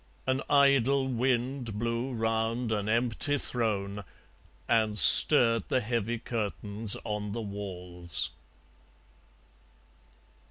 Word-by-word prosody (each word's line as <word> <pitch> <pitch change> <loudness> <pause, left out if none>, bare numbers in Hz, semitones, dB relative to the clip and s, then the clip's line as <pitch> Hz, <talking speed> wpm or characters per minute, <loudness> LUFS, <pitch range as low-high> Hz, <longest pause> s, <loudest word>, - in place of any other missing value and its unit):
An 130 +1 0
idle 140 -1 +3
wind 125 -2 -1
blew 115 +3 -2
round 115 0 -1
an 105 -1 -1
empty 120 +5 +1
throne 105 -6 -2 0.6
And 110 -2 +1
stirred 115 - +6
the 130 - +2
heavy 115 0 -2
curtains 105 -2 -4
on 105 -2 -4
the 115 - -4
walls. 90 -4 -4
115 Hz, 90 wpm, -28 LUFS, 105-125 Hz, 0.6 s, stirred